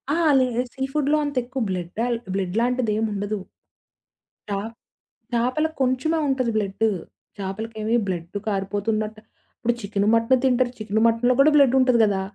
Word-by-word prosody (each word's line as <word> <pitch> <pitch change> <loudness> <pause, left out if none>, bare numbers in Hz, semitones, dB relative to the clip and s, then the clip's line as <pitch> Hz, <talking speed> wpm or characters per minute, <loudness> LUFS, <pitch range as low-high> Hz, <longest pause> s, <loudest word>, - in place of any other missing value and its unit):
ఆ! - - 0 0.2
లే, 255 - +4 0.3
సీ 265 0 -4
ఫుడ్‌లో 300 +1 +2
అంతెక్కువ 260 -2 -2
బ్లడ్ 180 +2 -4
ఆల్ 240 -1 0 0.2
బ్లడ్‌లాంటిదేం 220 +3 0
ఉండదు. 205 +1 -3 1.1
చ - - -4 0.8
చేపలకి 255 +7 0
కొంచెమే 260 +6 +1
ఉంటది 260 -3 0
బ్లడ్డు. 210 +2 0 0.5
చేపలకేమి 215 +3 -3
బ్లడ్ 175 +1 -4
కారిపోతున్నటు 210 +2 -2 0.4
ఇప్పుడు 240 0 0
చికెను, 200 0 -1
మటను 230 +3 +3
తింటారు. 250 -1 +2
చికెను 215 0 -1
మటను‌లో 235 +2 +3
కూడా 290 +3 +6
బ్లెడ్ 275 -3 +5
ఉంటది 250 -2 +3
కదా! 195 -2 0
230 Hz, 130 wpm, -23 LUFS, 205-255 Hz, 1.1 s, కూడా